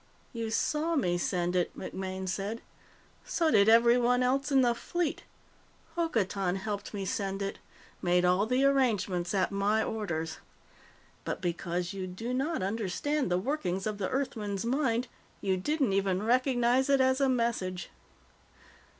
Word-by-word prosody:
"You 230 Hz, -2 st, -3 dB
saw 305 Hz, +8 st, 0 dB
me 175 Hz, -, +1 dB
send 175 Hz, 0 st, -1 dB
it," 175 Hz, -1 st, 0 dB
MacMaine 190 Hz, 0 st, -5 dB
said. 200 Hz, +5 st, -3 dB, 0.6 s
"So 325 Hz, -2 st, +1 dB
did 200 Hz, -3 st, +5 dB
everyone 240 Hz, +2 st, +5 dB
else 275 Hz, +3 st, +1 dB
in 270 Hz, -1 st, +5 dB
the 240 Hz, -2 st, +3 dB
fleet. 340 Hz, +6 st, -3 dB, 0.7 s
Hokotan 200 Hz, -, 0 dB
helped 205 Hz, +1 st, -4 dB
me 200 Hz, -2 st, -4 dB
send 195 Hz, 0 st, -2 dB
it 195 Hz, -, -4 dB, 0.4 s
made 180 Hz, 0 st, +3 dB
all 180 Hz, +4 st, +3 dB
the 255 Hz, +3 st, +2 dB
arrangements 210 Hz, -10 st, +1 dB
at 190 Hz, 0 st, +1 dB
my 205 Hz, +2 st, +1 dB
orders. 165 Hz, -7 st, -3 dB, 0.8 s
But -, -, -3 dB
because 175 Hz, +1 st, -2 dB
you 190 Hz, -1 st, -4 dB
do 225 Hz, +7 st, -5 dB
not 275 Hz, -, -1 dB
understand 225 Hz, +8 st, -1 dB
the 180 Hz, -, +2 dB
workings 190 Hz, -5 st, -2 dB
of 215 Hz, -1 st, -3 dB
the 190 Hz, -, -1 dB
Earthman's 225 Hz, -7 st, -2 dB
mind, 250 Hz, -1 st, +1 dB, 0.3 s
you 190 Hz, -2 st, 0 dB
didn't 270 Hz, +3 st, 0 dB
even 195 Hz, 0 st, +1 dB
recognize 250 Hz, +2 st, +2 dB
it 275 Hz, -1 st, +4 dB
as 260 Hz, +1 st, +3 dB
a 270 Hz, -, +4 dB
message. 230 Hz, -7 st, -1 dB
215 Hz, 145 wpm, -30 LUFS, 190-260 Hz, 0.8 s, did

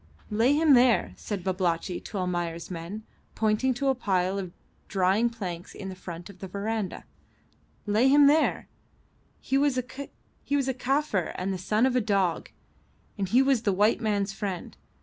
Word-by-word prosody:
"Lay 230 Hz, +6 st, +3 dB
him 305 Hz, -1 st, +5 dB
there," 245 Hz, -2 st, +4 dB
said 200 Hz, -4 st, -5 dB
Babalatchi 180 Hz, -1 st, -1 dB
to 210 Hz, -, -7 dB
Almayer's 175 Hz, -2 st, -3 dB
men, 180 Hz, +5 st, -6 dB, 0.3 s
pointing 220 Hz, +4 st, +1 dB
to 275 Hz, +2 st, -1 dB
a -, -, +4 dB
pile 195 Hz, -5 st, 0 dB
of 185 Hz, -3 st, -5 dB, 0.4 s
drying 195 Hz, +4 st, +2 dB
planks 180 Hz, -7 st, -6 dB
in 190 Hz, -1 st, -6 dB
front 175 Hz, -2 st, -8 dB
of 200 Hz, -3 st, -14 dB
the 190 Hz, -, -6 dB
verandah. 205 Hz, +1 st, -3 dB, 0.8 s
"Lay 215 Hz, +5 st, +3 dB
him 285 Hz, +1 st, +6 dB
there. 300 Hz, +3 st, +3 dB, 0.7 s
He 270 Hz, -, +1 dB
was 280 Hz, -2 st, +2 dB
a 255 Hz, -, 0 dB, 0.9 s
Kaffir 260 Hz, -, -1 dB
and 190 Hz, +1 st, -2 dB
the 185 Hz, -, -4 dB
son 215 Hz, +6 st, +2 dB
of 260 Hz, -1 st, +1 dB
a 250 Hz, -, +3 dB
dog, 195 Hz, -5 st, 0 dB, 0.7 s
and 195 Hz, -3 st, -3 dB
he 250 Hz, +5 st, +5 dB
was 270 Hz, -4 st, +2 dB
the 215 Hz, -3 st, +1 dB
white 210 Hz, +4 st, +2 dB
man's 205 Hz, -3 st, 0 dB
friend. 195 Hz, -3 st, -5 dB
205 Hz, 160 wpm, -27 LUFS, 185-245 Hz, 0.9 s, him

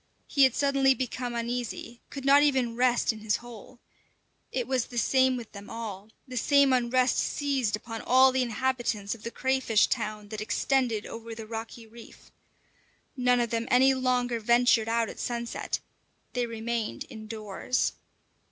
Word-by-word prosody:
He 275 Hz, -2 st, +4 dB
had 260 Hz, -, +1 dB
suddenly 275 Hz, -2 st, +3 dB
become 250 Hz, -1 st, -3 dB
uneasy, 235 Hz, 0 st, -4 dB
could 275 Hz, -1 st, -7 dB
not 280 Hz, +1 st, +7 dB
even 260 Hz, -5 st, +2 dB
rest 245 Hz, -1 st, +2 dB
in 220 Hz, -, -10 dB
his 215 Hz, -1 st, 0 dB
hole. 240 Hz, +1 st, -10 dB, 0.7 s
It 250 Hz, -2 st, -2 dB
was 260 Hz, -2 st, 0 dB
the 245 Hz, -, -9 dB
same 260 Hz, +2 st, +3 dB
with 235 Hz, -3 st, -9 dB
them 200 Hz, 0 st, -10 dB
all; 215 Hz, -3 st, -7 dB, 0.2 s
the 255 Hz, -1 st, -6 dB
same 280 Hz, +1 st, +4 dB
unrest 250 Hz, 0 st, +2 dB
seized 270 Hz, -7 st, 0 dB
upon 225 Hz, +1 st, -7 dB
all 260 Hz, +1 st, +5 dB
the 260 Hz, 0 st, +1 dB
inhabitants 240 Hz, -3 st, -1 dB
of 230 Hz, -, -12 dB
the 230 Hz, -, -5 dB
crayfish 260 Hz, -3 st, +2 dB
town 215 Hz, -3 st, -3 dB
that 215 Hz, -1 st, -5 dB
extended 235 Hz, -1 st, 0 dB
over 230 Hz, 0 st, -8 dB
the 220 Hz, 0 st, -8 dB
rocky 225 Hz, +1 st, -7 dB
reef. 230 Hz, +1 st, -15 dB, 0.8 s
None 250 Hz, -1 st, +3 dB
of 235 Hz, -1 st, -1 dB
them 230 Hz, 0 st, -1 dB
any 260 Hz, +2 st, +5 dB
longer 250 Hz, -2 st, 0 dB
ventured 235 Hz, 0 st, +3 dB
out 230 Hz, 0 st, +1 dB
at -, -, -9 dB
sunset; 235 Hz, -1 st, -3 dB, 0.5 s
they 245 Hz, -1 st, -1 dB
remained 230 Hz, 0 st, -3 dB
indoors. 215 Hz, +1 st, -3 dB
240 Hz, 160 wpm, -28 LUFS, 225-255 Hz, 0.8 s, not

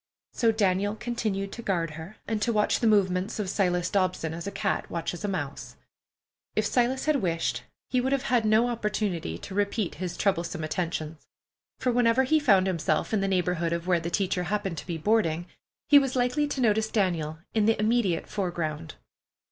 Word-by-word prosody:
So 230 Hz, -1 st, +2 dB
Daniel 205 Hz, -1 st, +1 dB
continued 215 Hz, -5 st, -3 dB
to 235 Hz, -, -7 dB
guard 170 Hz, -7 st, -1 dB
her, 160 Hz, +7 st, -9 dB
and 220 Hz, -1 st, -1 dB
to 235 Hz, -, +1 dB
watch 210 Hz, -2 st, +2 dB
the 230 Hz, -, +2 dB
movements 195 Hz, -1 st, +2 dB
of 200 Hz, -3 st, -2 dB
Silas 180 Hz, -3 st, +1 dB
Dobson 185 Hz, -5 st, 0 dB
as 170 Hz, +4 st, -6 dB
a -, -, -3 dB
cat 195 Hz, -, -2 dB
watches 170 Hz, +2 st, -4 dB
a -, -, 0 dB
mouse. 155 Hz, -8 st, -4 dB, 0.8 s
If -, -, +1 dB
Silas 255 Hz, +1 st, +1 dB
had 305 Hz, -2 st, +3 dB
wished, 170 Hz, -8 st, -1 dB, 0.3 s
he 255 Hz, -, +1 dB
would 260 Hz, +2 st, -1 dB
have 275 Hz, -2 st, +1 dB
had 240 Hz, -2 st, +2 dB
no 215 Hz, +2 st, +4 dB
opportunity 210 Hz, -, -2 dB
to 190 Hz, -, -9 dB
repeat 205 Hz, -1 st, 0 dB
his 180 Hz, -2 st, -3 dB
troublesome 170 Hz, -4 st, 0 dB
attentions, 160 Hz, -1 st, -3 dB, 0.5 s
for 250 Hz, -, 0 dB
whenever 240 Hz, +1 st, +3 dB
he 310 Hz, +4 st, +3 dB
found 195 Hz, -10 st, +4 dB
himself 165 Hz, -1 st, 0 dB
in 210 Hz, -, +2 dB
the 195 Hz, -, 0 dB
neighborhood 180 Hz, -3 st, 0 dB
of 170 Hz, 0 st, -3 dB
where 180 Hz, -2 st, +2 dB
the 165 Hz, +1 st, -4 dB
teacher 180 Hz, 0 st, 0 dB
happened 195 Hz, -3 st, -2 dB
to -, -, -11 dB
be 170 Hz, -2 st, -3 dB
boarding, 175 Hz, -3 st, +1 dB, 0.4 s
he 290 Hz, -, +8 dB
was 270 Hz, -2 st, -2 dB
likely 255 Hz, +4 st, +1 dB
to 280 Hz, -2 st, -3 dB
notice 220 Hz, -1 st, +2 dB
Daniel 170 Hz, -8 st, 0 dB, 0.2 s
in 215 Hz, -1 st, +2 dB
the 225 Hz, -, +3 dB
immediate 215 Hz, -6 st, +1 dB
foreground. 165 Hz, -5 st, -3 dB
195 Hz, 190 wpm, -27 LUFS, 170-225 Hz, 0.8 s, he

